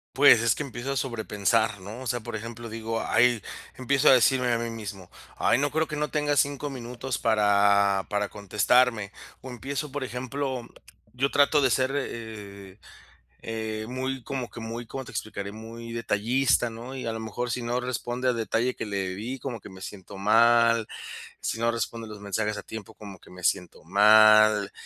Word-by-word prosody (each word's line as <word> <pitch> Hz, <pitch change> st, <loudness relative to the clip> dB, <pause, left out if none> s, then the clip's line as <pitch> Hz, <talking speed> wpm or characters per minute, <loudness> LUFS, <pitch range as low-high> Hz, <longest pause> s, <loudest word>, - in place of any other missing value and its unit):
Pues, 140 Hz, -4 st, +7 dB
es 115 Hz, -2 st, +3 dB
que -, -, -3 dB
empiezo 135 Hz, 0 st, -4 dB
a -, -, -5 dB
sobrepensar, 110 Hz, -4 st, 0 dB
¿no?, 105 Hz, +5 st, -8 dB
o 130 Hz, -, -6 dB
sea, 120 Hz, 0 st, -1 dB
por 115 Hz, 0 st, -5 dB
ejemplo, 115 Hz, +2 st, -8 dB
digo, 115 Hz, 0 st, -3 dB
ay, 120 Hz, 0 st, +3 dB, 0.3 s
empiezo 140 Hz, +3 st, +1 dB
a -, -, +9 dB
decirme 125 Hz, 0 st, +4 dB
a -, -, +2 dB
mí 115 Hz, 0 st, -3 dB
mismo: 100 Hz, -5 st, -7 dB, 0.3 s
"Ay, -, -, +2 dB
no 145 Hz, +1 st, 0 dB
creo 160 Hz, 0 st, +1 dB
que 150 Hz, -, -4 dB
no 150 Hz, 0 st, 0 dB
tenga 145 Hz, -1 st, 0 dB
5 145 Hz, +1 st, +1 dB
minutos 125 Hz, -1 st, -5 dB
para 100 Hz, -2 st, +3 dB
para 105 Hz, 0 st, -1 dB
contestarme". 105 Hz, +2 st, +2 dB, 0.3 s
O 130 Hz, -, -9 dB
empiezo, 135 Hz, +4 st, -5 dB
por 140 Hz, -1 st, -3 dB
ejemplo, 130 Hz, 0 st, -4 dB, 0.5 s
yo 135 Hz, +2 st, +2 dB
trato 145 Hz, +1 st, +4 dB
de 135 Hz, -, +3 dB
ser, 130 Hz, +2 st, +1 dB
eh 105 Hz, -6 st, -7 dB, 0.7 s
eh, 110 Hz, -1 st, -4 dB
muy 130 Hz, 0 st, -3 dB
como 130 Hz, -1 st, -4 dB
que 115 Hz, -, -10 dB
muy, 115 Hz, +1 st, -6 dB
¿cómo 135 Hz, +3 st, -6 dB
te -, -, -11 dB
explicaré? 100 Hz, -2 st, -5 dB
Muy 115 Hz, +1 st, -9 dB
detallista, 120 Hz, +3 st, +1 dB
¿no?, 120 Hz, +4 st, -8 dB
y, 130 Hz, -, -5 dB
a 115 Hz, -, -1 dB
lo 110 Hz, -, -5 dB
mejor, 120 Hz, +3 st, -4 dB
si 125 Hz, -, -2 dB
no 120 Hz, +1 st, -1 dB
responde 125 Hz, 0 st, -3 dB
al 125 Hz, -, +2 dB
detalle 115 Hz, +2 st, 0 dB
que -, -, -5 dB
le 100 Hz, -2 st, -2 dB
di, 120 Hz, +7 st, -5 dB
como 125 Hz, -4 st, -5 dB
que -, -, -11 dB
me 95 Hz, -1 st, -12 dB
siento 100 Hz, 0 st, -9 dB
mal, 115 Hz, +2 st, +4 dB, 0.5 s
si -, -, -2 dB
no 115 Hz, 0 st, +2 dB
responde 115 Hz, 0 st, -4 dB
los 105 Hz, -1 st, -9 dB
mensajes 105 Hz, +1 st, -2 dB
a -, -, -6 dB
tiempo, 110 Hz, -3 st, -9 dB
como 100 Hz, -3 st, -11 dB
que -, -, -18 dB
me 90 Hz, 0 st, -12 dB
siento 90 Hz, -2 st, -1 dB
mal. 105 Hz, +1 st, +6 dB
115 Hz, 190 wpm, -26 LUFS, 105-125 Hz, 0.7 s, a